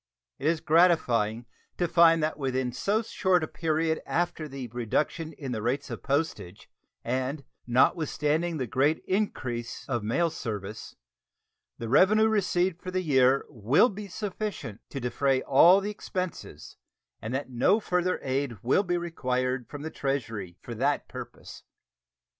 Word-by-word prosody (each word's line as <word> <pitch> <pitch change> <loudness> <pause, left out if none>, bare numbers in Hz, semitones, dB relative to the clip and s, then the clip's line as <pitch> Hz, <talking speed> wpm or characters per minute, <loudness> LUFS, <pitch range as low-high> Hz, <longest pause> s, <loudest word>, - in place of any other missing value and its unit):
It 145 - -1
is 160 -1 +1
gratifying 125 -10 +3 0.3
to 175 - +1
find 165 -1 +5
that 155 -1 -1
within 130 -2 -1
so 210 - 0
short 185 -5 +1
a - - -2
period 160 0 -1
after 170 -2 -1
the 135 -3 -6
reduction 125 +8 -2
in 135 -4 -6
the 110 -3 -3
rates 130 +5 -2
of - - -6
postage, 140 - -2 0.4
and 130 +4 -2 0.2
notwithstanding 155 +5 +1
the 130 - -2
great 135 +7 +1
increase 130 - -2
of 120 -4 -1
mail 160 +11 +1
service, 110 -7 -6 0.8
the 115 - -5
revenue 205 - +5
received 185 -4 +1
for 185 - -6
the 185 0 -1
year 135 -3 +3
will 120 - +3
be 205 +1 -7
sufficient 195 - -5
to 140 - -5
defray 130 +2 0
all 170 +8 +6
the 205 +1 -3
expenses, 185 -4 -6 0.4
and 110 - -5
that 135 -1 -4
no 155 - +3
further 180 -3 0
aid 130 -3 -1
will 130 +10 +3
be 175 -3 -1
required 130 -7 -2
from 145 0 -7
the 160 - -5
Treasury 115 -10 -3
for - - -6
that - - 0
purpose. - - -9
145 Hz, 145 wpm, -27 LUFS, 125-175 Hz, 0.8 s, all